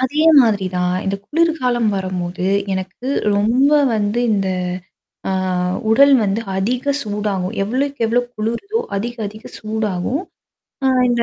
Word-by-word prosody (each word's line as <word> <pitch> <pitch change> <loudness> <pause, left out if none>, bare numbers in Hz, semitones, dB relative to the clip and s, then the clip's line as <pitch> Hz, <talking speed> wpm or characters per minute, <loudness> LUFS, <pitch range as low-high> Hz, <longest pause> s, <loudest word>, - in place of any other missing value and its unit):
அதே 290 +5 +1 0.2
மாதிரி 210 -6 +2
தான். 180 0 +1
இந்த 195 0 -1
குளிர்காலம் 275 -8 +1
வரும்போது, 185 -1 -3 0.3
எனக்கு 190 +6 -5 0.3
ரொம்ப 245 +8 +3 0.2
வந்து 210 +2 0
இந்த 195 -2 0 0.8
ஆ - - 0 0.6
உடல் 280 +5 +6
வந்து 205 +2 0 0.2
அதிக 240 +6 -1 0.2
சூடாகும். 205 -3 -2
எவ்ளோக்கு, 265 +5 -2
எவ்ளோ 240 +2 +2
குளுருதோ 235 - -2 0.2
அதிக 240 +4 -3
அதிக 215 +2 -11
சூடாகும். 215 - -2 0.7
ஆ - - +4 0.2
இந்த 240 -1 +2
220 Hz, 125 wpm, -19 LUFS, 195-250 Hz, 0.8 s, உடல்